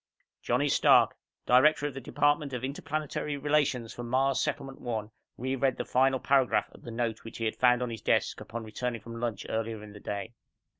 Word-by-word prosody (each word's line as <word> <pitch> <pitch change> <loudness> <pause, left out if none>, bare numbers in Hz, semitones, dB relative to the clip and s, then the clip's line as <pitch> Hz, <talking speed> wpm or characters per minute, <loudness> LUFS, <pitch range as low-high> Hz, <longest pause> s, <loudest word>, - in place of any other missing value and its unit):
_ - - -62
Johnny - - +1
Stark, - - +5 0.3
director 145 +4 +5
of 145 - -2
the 135 - -6
department 145 +2 +1
of 125 -1 -4
Interplanetary 145 +1 -3
Relations 140 -5 +1
for - - -7
Mars' 130 +2 +1
Settlement 135 -2 -3
One, 110 -3 -3 0.3
reread 130 +1 0
the - - -3
final 130 +1 +3
paragraph 135 -2 +2
of - - -16
the - - -9
note 115 -1 -2
which 115 - -9
he 115 - -2
had 110 - -1
found 125 0 +4
on 120 - -3
his 115 - -6
desk, - - +1
upon 115 +1 -6
returning 115 +1 -4
from 115 +1 -8
lunch 115 -4 -3
earlier 110 -1 -3
in 105 -1 -11
the 105 - -11
day. 105 +3 -5
125 Hz, 200 wpm, -29 LUFS, 115-135 Hz, 0.3 s, Stark